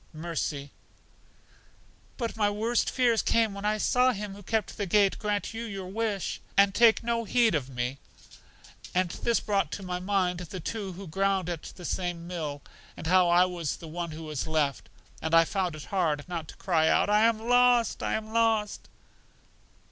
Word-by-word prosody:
Mercy: 155 -3 -4 1.5
But 235 -3 -3
my 210 -2 +2
worst 225 +3 0
fears 240 -3 +2
came 225 -3 +2
when 200 +1 -6
I 215 0 +1
saw 250 +4 +3
Him 205 -2 -5
who 200 - -11
kept 220 +2 -2
the 205 -2 -2
gate 200 +1 +3
grant 210 0 -2
you 225 +1 -5
your 200 -4 -6
wish, 205 -3 -2 0.2
and 200 0 +5
take 230 0 +5
no 235 0 0
heed 230 -1 +3
of 140 -4 -1
me. 125 +1 -3 1.0
And 180 -1 +2
this 235 +4 0
brought 200 -2 0
to 200 - -5
my 180 -1 -3
mind 185 -2 0
the 180 +1 -7
two 195 +2 -4
who 195 +3 -9
ground 190 +1 0
at 165 -3 -4
the 180 - -10
same 175 -2 -3
mill, 155 -5 -5 0.3
and - - -8
how 180 +1 +4
I 175 +1 +5
was 175 -4 -3
the 165 - -10
one 170 +2 -4
who 160 +1 -8
was 155 -2 -4
left; 150 -3 -1 0.3
and 160 +1 +1
I 165 0 +7
found 180 -3 -2
it 150 - -8
hard 160 -6 -1
not 170 -3 -4
to - - -11
cry 165 -4 +1
out, - - +3
I 210 +1 +4
am 230 -1 +3
lost! 245 0 +3
I - - 0
am 220 0 -5
lost! 225 -2 +1
195 Hz, 185 wpm, -28 LUFS, 170-220 Hz, 1.5 s, I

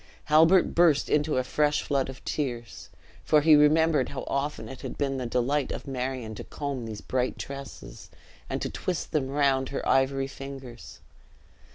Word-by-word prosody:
Halbert 165 +3 +5
burst 165 -4 +3
into 150 -1 +2
a 130 - +2
fresh 150 +3 +1
flood 135 -2 0
of 130 - -10
tears, 120 -6 -4 0.3
for 150 - +4
he 155 0 +7
remembered 150 -1 +4
how 140 - -5
often 140 -4 -2
it 130 +2 -9
had - - -6
been 135 -2 -1
the 125 -2 -3
delight 130 +4 0
of - - -6
Marion 130 -3 -4
to - - -7
comb 140 -5 -5
these 110 -2 -7
bright 130 0 -1
tresses 135 - -9 0.4
and - - -2
to - - -2
twist 180 -2 -3
them 150 -4 0
round 135 -1 +1
he 140 - -4
ivory 135 0 +2
fingers. 135 -3 -9
135 Hz, 170 wpm, -27 LUFS, 130-150 Hz, 0.4 s, he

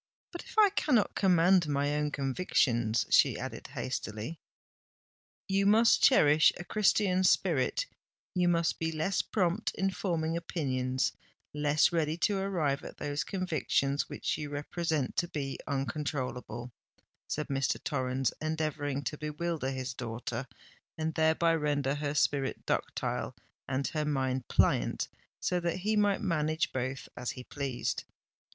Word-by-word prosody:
"But 345 - -6
if - - -14
I 420 -2 +7
cannot 265 - +2
command 180 -2 +4
my 145 0 0
own 150 0 0
convictions?" 125 -5 +1
she - - +5
added - - -6
hastily. 115 +4 -4 1.1
"You 195 0 +2
must 225 +3 +5
cherish 155 - +6
a 175 - -6
Christian 190 -1 +2
spirit—you 180 - 0
must 170 -1 +1
be 160 0 -1
less 160 +5 0
prompt 190 +1 0
in 195 0 0
forming 165 -4 -1
opinions—less 145 0 -1
ready 160 -2 0
to 200 +2 +1
arrive 165 -8 0
at - - -9
those 145 0 -2
convictions 155 -6 0
which - - -2
you 150 -1 -4
represent 150 0 -2
to 175 - +1
be 140 -5 -4
uncontrollable," 135 -3 -3 0.6
said 150 - -3
Mr. 135 -1 0
Torrens, 130 -2 -1
endeavouring 155 -3 -2
to 140 +4 -4
bewilder 150 -1 -2
his 130 -1 -4
daughter, 120 +1 -5 0.5
and 160 0 -1
thereby 160 +1 +3
render 145 -3 0
her 145 0 -2
spirit 140 -1 0
ductile - - -2 0.3
and 135 +1 -1
her 155 -1 -1
mind 130 -3 -1
pliant, - - +2 0.3
so 180 - 0
that 170 0 -1
he 215 +3 +1
might 205 -2 +2
manage 160 -5 0
both 130 +1 -3
as 125 - -4
he 125 - -6
pleased. 130 -3 -3
150 Hz, 130 wpm, -30 LUFS, 135-175 Hz, 1.1 s, I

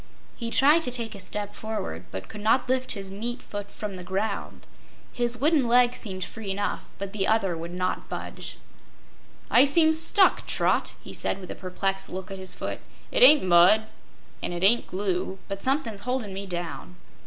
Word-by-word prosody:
He 235 -2 -4
tried 290 +7 +5
to 290 - -2
take 235 -3 0
a 200 - -9
step 205 +2 -5
forward, 205 - -5
but 95 0 -7
could 210 - -9
not 225 +4 +3
lift 255 0 +2
his 195 -2 -6
meat 235 +5 -4
foot 205 -1 -6
from 205 -2 -6
the 180 - -8
ground. 200 +3 -3 0.5
His 240 0 0
wooden 290 -1 +3
leg 245 +1 +4
seemed 190 -4 -5
free 220 -3 -7
enough, 205 +1 -2
but 200 0 -6
the 200 -2 0
other 200 -5 +2
would 165 +1 -6
not 185 0 -2
budge. - - -6 0.9
"I 245 - +7
seem 315 +3 +5
stuck, 330 +5 +4
Trot," - - +1
he - - -9
said, 190 - -2
with 185 - -8
a - - -6
perplexed 195 +1 -2
look 185 +1 -6
at 195 - -6
his 185 -1 -9
foot. - - -4 0.3
"It - - +1
ain't 310 - +9
mud, 185 +4 +6 0.6
an' - - -3
it 175 +1 -4
ain't 230 +5 +4
glue, 190 -1 -2
but 195 0 -5
somethin's 260 -7 -1
holdin' 250 -5 -2
me 195 +1 -6
down." 175 0 -5
205 Hz, 190 wpm, -26 LUFS, 190-245 Hz, 0.9 s, ain't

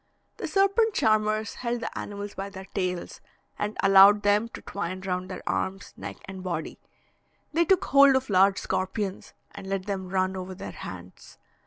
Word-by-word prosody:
The - - -4
serpent 395 +3 +2
charmers 215 0 +1
held 240 -1 -3
the - - -5
animals 205 0 -6
by 195 +1 -5
their 190 -1 -9
tails, 180 -2 -4 0.4
and 210 +1 -3
allowed 195 +1 +7
them 205 +3 +3
to - - -9
twine 185 -2 -4
round 185 -1 -3
their 185 - -7
arms, 195 +1 -3
neck, - - -7
and 190 -1 -8
body; 170 -4 -4 0.7
they 340 +2 +3
took 375 +2 +3
hold 275 -1 +6
of 260 0 0
large 195 0 +4
scorpions, 190 +1 -3 0.2
and 195 -1 -10
let 195 -1 -2
them 190 -2 -4
run 185 0 0
over 185 0 -6
their 195 - -7
hands. 90 0 -10
195 Hz, 170 wpm, -26 LUFS, 185-215 Hz, 0.7 s, allowed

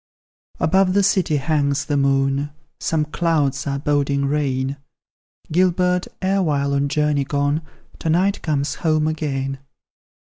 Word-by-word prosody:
Above 190 +2 +3
the 200 - +4
city 190 -5 +2
hangs 140 -1 0
the 145 - -1
moon, 135 +1 +1 0.3
Some 155 0 0
clouds 150 -4 0
are 140 0 -1
boding 140 -1 0
rain; 140 -1 -1 0.7
Gilbert, 180 +1 +2 0.2
erewhile 155 -8 +1
on 140 0 +1
journey 150 -1 +1
gone, 145 +2 0 0.4
To 160 - -2
night 185 +5 +2
comes 145 -2 -1
home 155 -2 +2
again. 135 -4 -2
150 Hz, 125 wpm, -21 LUFS, 140-160 Hz, 0.7 s, the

